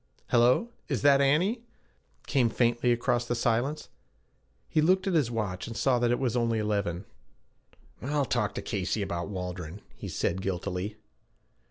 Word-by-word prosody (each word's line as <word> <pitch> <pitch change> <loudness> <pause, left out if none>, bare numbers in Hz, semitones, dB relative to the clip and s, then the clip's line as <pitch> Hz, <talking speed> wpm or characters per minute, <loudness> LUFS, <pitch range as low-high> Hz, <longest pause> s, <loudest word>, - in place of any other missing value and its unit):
'Hello, 125 - +4 0.2
is - - -2
that 140 -1 +6
Annie?' 175 - +2 0.6
came 125 -4 +2
faintly 120 +1 +2
across 120 0 +1
the 120 - 0
silence. 120 +6 0 0.8
He 155 - +2
looked 185 +4 +3
at 190 - 0
his 150 -8 +3
watch, 105 -6 -3
and 115 -1 -6
saw 125 +1 +2
that 120 0 +2
it 120 - +2
was 125 -3 -1
only 115 -2 +1
eleven. 100 -4 -1 1.0
'I'll 145 +1 0
talk 105 -5 -1
to - - -4
Casey 100 0 -1
about 85 -1 -3
Waldron,' 90 -1 -5
he - - -8
said 95 +3 -1
guiltily. 95 +2 -3
120 Hz, 155 wpm, -28 LUFS, 100-135 Hz, 1.0 s, that